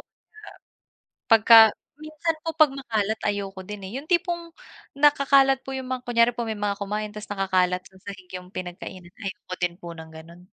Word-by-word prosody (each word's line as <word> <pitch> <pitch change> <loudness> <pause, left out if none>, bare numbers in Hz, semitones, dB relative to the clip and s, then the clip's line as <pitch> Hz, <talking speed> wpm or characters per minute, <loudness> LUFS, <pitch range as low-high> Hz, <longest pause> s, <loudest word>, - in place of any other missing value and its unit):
nga. - - -25 1.1
Pagka 225 +1 +6 0.4
minsan 310 +2 -3
po 325 - -2
pag 310 -2 +5
makalat 220 -6 -2
ayoko 195 -2 -3
din, 210 +1 -8
eh. - - -11
Yung 280 - -7
tipong 345 -1 -1 0.4
nakakalat 275 -1 +4
po 270 - -6
yung 260 -1 -5
mga 255 -1 -3
kunyari 235 0 +3
po 235 -1 -3
may 220 -1 -4
mga 205 -1 -1
kumain 210 +1 -3
tas 210 0 -9
nakakalat 185 -2 +1
sa 190 - -26
sahig 195 -2 -9
yung 180 +1 -14
pinagkainan 180 0 -8
ayoko 190 -2 -7
din 175 -1 -1
po 170 -1 -8
ng 160 0 -10
gano'n. 165 +2 -13
210 Hz, 175 wpm, -24 LUFS, 185-270 Hz, 1.1 s, Pagka